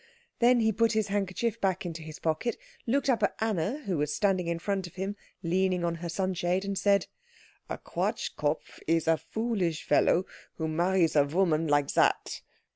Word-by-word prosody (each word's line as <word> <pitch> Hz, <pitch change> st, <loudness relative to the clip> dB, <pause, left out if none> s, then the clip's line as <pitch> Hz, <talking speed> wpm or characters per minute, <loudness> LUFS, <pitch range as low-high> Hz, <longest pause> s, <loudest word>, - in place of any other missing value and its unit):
Then 245 Hz, 0 st, +5 dB
he 220 Hz, 0 st, +3 dB
put 230 Hz, +2 st, +2 dB
his 215 Hz, -2 st, 0 dB
handkerchief 205 Hz, +3 st, -1 dB
back 190 Hz, -1 st, 0 dB
into 165 Hz, -2 st, -5 dB
his 155 Hz, -1 st, -8 dB
pocket, 165 Hz, +9 st, -1 dB, 0.3 s
looked 275 Hz, +5 st, +1 dB
up 250 Hz, -5 st, +2 dB
at 205 Hz, -, +1 dB
Anna, 220 Hz, -, -1 dB
who 180 Hz, -6 st, -1 dB
was 150 Hz, 0 st, 0 dB
standing 185 Hz, +3 st, +1 dB
in 170 Hz, 0 st, 0 dB
front 190 Hz, +1 st, -2 dB
of 175 Hz, -, -16 dB
him 195 Hz, +2 st, -3 dB, 0.3 s
leaning 180 Hz, +1 st, +1 dB
on 170 Hz, -, 0 dB
her 170 Hz, -, -4 dB
sunshade, 185 Hz, +1 st, -1 dB
and 200 Hz, 0 st, -2 dB
said, 200 Hz, 0 st, +3 dB, 0.6 s
"A -, -, -3 dB
Quatschkopf -, -, -2 dB
is 165 Hz, -1 st, +2 dB
a 165 Hz, 0 st, +4 dB
foolish 180 Hz, -1 st, -2 dB
fellow 180 Hz, +2 st, +3 dB, 0.3 s
who 160 Hz, -, -2 dB
marries 170 Hz, +1 st, +2 dB
a 145 Hz, -, +6 dB
woman 165 Hz, +1 st, +1 dB
like 145 Hz, -1 st, +2 dB
that." -, -, +2 dB
185 Hz, 180 wpm, -29 LUFS, 165-205 Hz, 0.6 s, a